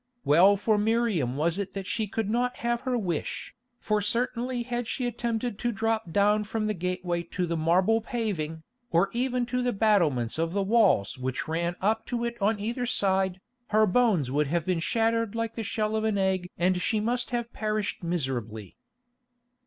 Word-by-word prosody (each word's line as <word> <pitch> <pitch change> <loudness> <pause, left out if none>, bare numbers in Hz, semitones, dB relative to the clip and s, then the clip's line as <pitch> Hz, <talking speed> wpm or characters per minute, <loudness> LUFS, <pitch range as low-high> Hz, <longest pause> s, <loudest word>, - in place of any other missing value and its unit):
Well 180 +8 +6
for 210 +1 +2
Miriam 210 - +1
was 165 +5 +1
it 200 - -4
that 195 -1 -4
she 215 +3 -1
could 220 +1 -2
not 245 +3 0
have 235 0 +1
her 250 - +1
wish, 175 -8 -3 0.2
for 215 -3 0
certainly 240 +3 0
had 240 -1 -3
she 255 - -2
attempted 235 -2 -2
to 240 - 0
drop 225 -3 -1
down 205 +3 +3
from 215 +1 -2
the 215 - 0
gateway 180 -1 -2
to 180 +2 -3
the 170 -1 -2
marble 180 +8 +3
paving, 185 - -3 0.3
or 175 +4 +2
even 250 +1 0
on - - -1
to 250 +1 -1
the 245 -1 0
battlements 165 - +2
of 165 +1 0
the 200 0 +1
walls 195 - +3
which 130 0 -3
ran 170 +2 -1
up 220 +3 0
to 235 -1 -2
it 235 0 -3
on 210 +1 +2
either 240 +4 -2
side, 190 -4 +1 0.3
her 215 0 +4
bones 195 - +2
would 145 +1 +1
have 170 +2 -1
been 185 -2 0
shattered 225 +3 0
like 230 0 -2
the 230 - -4
shell 215 0 -1
of 220 - 0
an 220 -2 +1
egg 190 -2 0
and 180 +1 +1
she 220 - +1
must 240 +3 -1
have 240 -1 -3
perished 215 -1 -2
miserably. 130 - -3
210 Hz, 190 wpm, -27 LUFS, 175-230 Hz, 0.3 s, Well